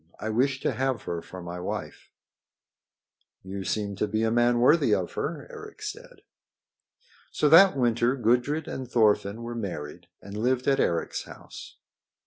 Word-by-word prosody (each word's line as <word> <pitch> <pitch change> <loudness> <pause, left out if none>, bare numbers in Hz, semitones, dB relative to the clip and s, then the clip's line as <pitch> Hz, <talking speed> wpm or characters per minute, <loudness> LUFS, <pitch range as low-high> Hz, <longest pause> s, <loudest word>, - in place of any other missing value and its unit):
I 110 - -3
wish 130 +4 +1
to - - 0
have 130 -4 -1
her 85 -1 -4
for 90 +1 -10
my 85 +1 -6
wife." 90 - -6 1.3
"You 95 +1 -6
seem 100 0 -2
to 105 - 0
be 110 +2 -1
a 110 - +1
man 120 +1 +3
worthy 140 +7 +4
of - - -3
her," - - -4
Eric 430 -2 -11
said. 470 +4 -8 1.1
So 150 - +1
that 180 0 +7
winter 120 0 +2
Gudrid 125 +5 +1
and 130 -2 -6
Thorfinn 110 -1 +2
were 120 0 -5
married 90 -10 -6
and 100 +1 -10
lived 125 +4 0
at 135 -1 +3
Eric's 85 -1 -1
house. - - -12
120 Hz, 155 wpm, -27 LUFS, 105-135 Hz, 1.3 s, that